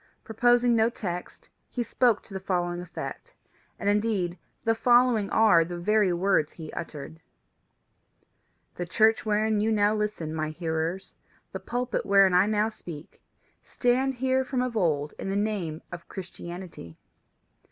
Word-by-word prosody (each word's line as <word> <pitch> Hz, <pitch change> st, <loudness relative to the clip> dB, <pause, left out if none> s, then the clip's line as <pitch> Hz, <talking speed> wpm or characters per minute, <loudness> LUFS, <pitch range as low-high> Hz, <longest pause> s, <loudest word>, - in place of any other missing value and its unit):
Preposing 240 Hz, +2 st, +3 dB
no 225 Hz, 0 st, +3 dB
text, 180 Hz, -6 st, -6 dB, 0.2 s
he 245 Hz, -, -2 dB
spoke 235 Hz, -2 st, +2 dB
to 200 Hz, -, -13 dB
the 190 Hz, -, -3 dB
following 175 Hz, -2 st, -2 dB
effect, 180 Hz, 0 st, -8 dB, 0.4 s
and -, -, -4 dB
indeed 205 Hz, -4 st, +1 dB, 0.3 s
the 225 Hz, -, +3 dB
following 240 Hz, -2 st, +3 dB
are 220 Hz, -6 st, +5 dB
of 165 Hz, -, -1 dB
the 175 Hz, -, -4 dB
very 210 Hz, +2 st, +2 dB
words 175 Hz, -3 st, +1 dB
he 160 Hz, -2 st, -9 dB
uttered: 160 Hz, 0 st, -7 dB, 1.6 s
"The 175 Hz, -, -3 dB
church 220 Hz, +4 st, +3 dB
wherein 215 Hz, 0 st, +2 dB
you 220 Hz, +1 st, +1 dB
now 210 Hz, -1 st, +3 dB
listen, 210 Hz, -7 st, -2 dB
my 155 Hz, -1 st, -2 dB
hearers, 165 Hz, +3 st, -3 dB, 0.4 s
the -, -, -5 dB
pulpit 245 Hz, 0 st, -2 dB
wherein 195 Hz, -2 st, +5 dB
I 180 Hz, +3 st, +5 dB
now 215 Hz, 0 st, +1 dB
speak, 170 Hz, -8 st, -11 dB, 0.4 s
stand 260 Hz, +2 st, +1 dB
here 260 Hz, +1 st, +1 dB
from 255 Hz, -1 st, -1 dB
of 250 Hz, -2 st, -3 dB
old 150 Hz, -7 st, 0 dB
in -, -, -4 dB
the 195 Hz, -, -1 dB
name 200 Hz, -7 st, -2 dB
of 175 Hz, -1 st, -8 dB
Christianity. 175 Hz, -, -9 dB
200 Hz, 150 wpm, -27 LUFS, 175-225 Hz, 1.6 s, are